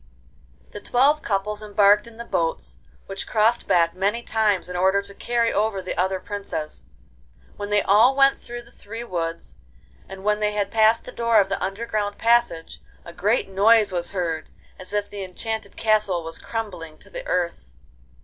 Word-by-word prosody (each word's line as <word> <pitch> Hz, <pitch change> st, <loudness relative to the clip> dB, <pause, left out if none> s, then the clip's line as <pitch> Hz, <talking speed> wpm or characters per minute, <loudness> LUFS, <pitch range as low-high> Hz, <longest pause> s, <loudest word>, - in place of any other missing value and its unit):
The 205 Hz, -, -8 dB
twelve 285 Hz, +5 st, +3 dB
couples 210 Hz, +1 st, -2 dB
embarked 205 Hz, +1 st, +3 dB
in 230 Hz, -1 st, -14 dB
the 235 Hz, -, -7 dB
boats, 65 Hz, -, -2 dB, 0.3 s
which -, -, -5 dB
crossed 225 Hz, +2 st, +2 dB
back 170 Hz, -1 st, +3 dB
many 200 Hz, +6 st, -1 dB
times 215 Hz, -5 st, +1 dB
in 180 Hz, -, -6 dB
order 190 Hz, +2 st, +3 dB
to 200 Hz, 0 st, -8 dB
carry 235 Hz, +2 st, 0 dB
over 210 Hz, -1 st, 0 dB
the 185 Hz, -, -5 dB
other 190 Hz, +1 st, 0 dB
princes. 190 Hz, -7 st, -6 dB, 0.7 s
Then 205 Hz, 0 st, -4 dB
they 205 Hz, -1 st, +3 dB
all 225 Hz, +7 st, +5 dB
went 275 Hz, 0 st, +4 dB
through 240 Hz, 0 st, -8 dB
the 235 Hz, -, -20 dB
three 225 Hz, 0 st, -8 dB
woods, 170 Hz, -6 st, -4 dB, 0.5 s
and 195 Hz, 0 st, -9 dB
when 210 Hz, 0 st, +1 dB
they 210 Hz, 0 st, 0 dB
had 200 Hz, -1 st, -1 dB
passed 220 Hz, 0 st, +4 dB
the -, -, -9 dB
door 230 Hz, -2 st, +3 dB
of 195 Hz, -1 st, +2 dB
the 195 Hz, -, -2 dB
underground 205 Hz, +1 st, -2 dB
passage 230 Hz, -8 st, +1 dB, 0.2 s
a 170 Hz, -, -10 dB
great 210 Hz, +7 st, +1 dB
noise 205 Hz, +2 st, +4 dB
was 175 Hz, -1 st, -2 dB
heard, 165 Hz, -5 st, -3 dB, 0.3 s
as 185 Hz, -, -7 dB
if 205 Hz, 0 st, -1 dB
the 200 Hz, -1 st, -7 dB
enchanted 220 Hz, +3 st, -5 dB
castle 210 Hz, -6 st, +2 dB
was 165 Hz, 0 st, -6 dB
crumbling 180 Hz, -9 st, -6 dB
to -, -, -17 dB
the -, -, -7 dB
earth. 65 Hz, -, -2 dB
205 Hz, 180 wpm, -23 LUFS, 185-225 Hz, 0.7 s, all